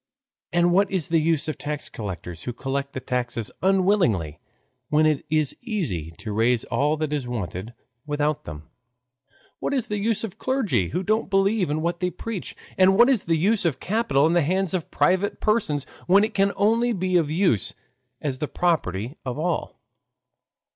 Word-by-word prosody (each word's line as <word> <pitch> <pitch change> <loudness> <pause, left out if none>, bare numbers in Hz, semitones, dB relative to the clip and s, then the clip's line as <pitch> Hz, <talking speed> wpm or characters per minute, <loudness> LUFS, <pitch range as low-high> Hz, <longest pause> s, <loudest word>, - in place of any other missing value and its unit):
And 175 0 +3
what 195 +2 +3
is 185 -5 0
the 165 0 +3
use 160 -1 +1
of 155 - -4
tax 150 0 -4
collectors 90 -5 -6
who 125 - -3
collect 140 +2 -3
the - - -3
taxes 120 -3 -3
unwillingly, 185 - +2 0.5
when 155 +1 +4
it 155 -2 +2
is 155 -2 +1
easy 160 - -3
to 110 - -6
raise 115 +2 +2
all 150 +2 0
that 155 -1 -2
is 140 -4 -2
wanted 110 -1 -5 0.3
without 150 0 0
them? 75 0 -8 1.0
What 280 - -1
is 255 - -1
the 210 0 -1
use 225 +1 +1
of 220 - -3
the - - -24
clergy, 200 - 0
who 180 - -2
don't 215 +3 0
believe 195 -1 +2
in 155 +2 -1
what 170 0 -1
they 180 - 0
preach? 215 +1 -6 0.2
And 190 +1 +6
what 240 +4 +7
is 240 -7 +1
the 165 -1 +2
use 200 +6 +2
of 155 -7 0
capital 210 -8 +1
in 165 - +3
the 175 - +4
hands 185 +4 0
of 180 -4 -2
private 190 +2 +1
persons, 185 - +1 0.2
when 195 +3 +6
it 215 0 -1
can 195 0 +2
only 230 +3 +2
be 185 -2 -1
of 165 -4 +3
use 155 - +1 0.5
as 135 -3 -2
the 150 - -2
property 135 - -1
of 125 -1 -4
all? 165 +1 -2
165 Hz, 185 wpm, -24 LUFS, 130-195 Hz, 1.0 s, what